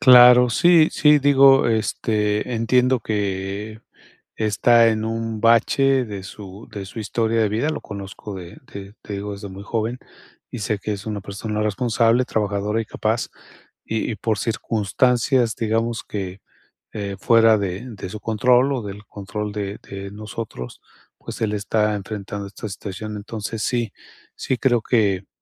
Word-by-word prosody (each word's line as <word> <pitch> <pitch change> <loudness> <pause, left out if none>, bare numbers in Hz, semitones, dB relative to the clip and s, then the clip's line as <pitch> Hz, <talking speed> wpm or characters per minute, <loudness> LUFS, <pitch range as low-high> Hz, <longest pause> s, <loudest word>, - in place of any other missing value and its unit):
Claro, 125 -1 +8
sí 170 +4 +5
sí, 150 -1 +5
digo, 135 -1 +6
este, 110 0 0
entiendo 125 +3 +2
que 100 +1 -3 0.5
está 115 +2 +4
en 110 -1 0
un 115 -1 -3
bache 130 +4 +3
de 100 -4 -7
su 100 +1 -10
de 100 -2 -5
su 105 - -10
historia 115 +1 0
de 110 - +3
vida, 115 +9 0
lo 155 - -4
conozco 100 0 -8
de 90 -2 -9
de, 100 0 -9
te 105 - -8
digo, 100 +1 -4
desde 100 0 -7
muy 95 +1 -9
joven, 115 +3 -2 0.5
y - - -6
sé 105 +1 -1
que 105 - -3
es 100 0 -7
una 105 -2 -3
persona 105 +2 -4
responsable, 115 +2 +2
trabajadora 105 0 -1
y - - -3
capaz, 110 +1 -1 0.6
y 110 +1 -2
y - - -3
por 110 +1 -1
circunstancias, 115 +3 +1
digamos 115 0 -1
que, 95 -1 -5 0.5
eh, 100 -2 -4
fuera 115 -2 +5
de 95 -2 -3
de 100 -4 -7
su 105 - -7
control 125 +5 +3
o 130 -3 -2
del 105 0 -8
control 105 +1 -5
de 100 -1 -4
de 100 0 -8
nosotros, 105 - -7 0.4
pues, - - -8
él 110 -2 0
está 105 +1 0
enfrentando 100 0 -5
esta 100 +2 -7
situación, 105 +2 -6
entonces, 110 +1 -5
sí 120 -4 -1 0.4
sí 130 - -1
creo 120 -2 +2
que, 100 -6 +1
110 Hz, 155 wpm, -22 LUFS, 100-115 Hz, 0.6 s, Claro